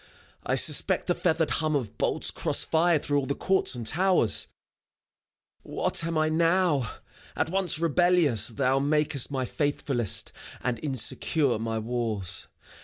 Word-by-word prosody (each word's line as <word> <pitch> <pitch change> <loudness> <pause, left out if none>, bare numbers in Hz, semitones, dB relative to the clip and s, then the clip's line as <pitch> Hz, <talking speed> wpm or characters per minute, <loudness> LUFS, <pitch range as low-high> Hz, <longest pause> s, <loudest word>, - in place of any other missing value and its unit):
I - - -1
suspect - - +2
the 175 - +1
feathered 160 -3 -1
hum 155 -1 -1
Of 115 -6 -4
bolts - - 0
cross - - 0
fired 165 -1 +1
through 145 0 0
all 135 - -4
the 140 - -2
courts 190 -7 +1
and 120 -2 -6
towers. 175 - +2 1.1
What - - 0
am 165 -1 -2
I 155 0 +1
now? 165 -5 +1 0.4
At - - -2
once 190 -4 0
rebellious 165 - +2
thou 130 +2 0
Makest 150 -1 +1
my 135 -2 -3
faithfullest, 135 - -2 0.3
and 125 -2 -3
insecure 135 -1 +1
My 115 0 -3
walls. 110 -4 -4
145 Hz, 140 wpm, -26 LUFS, 120-165 Hz, 1.1 s, suspect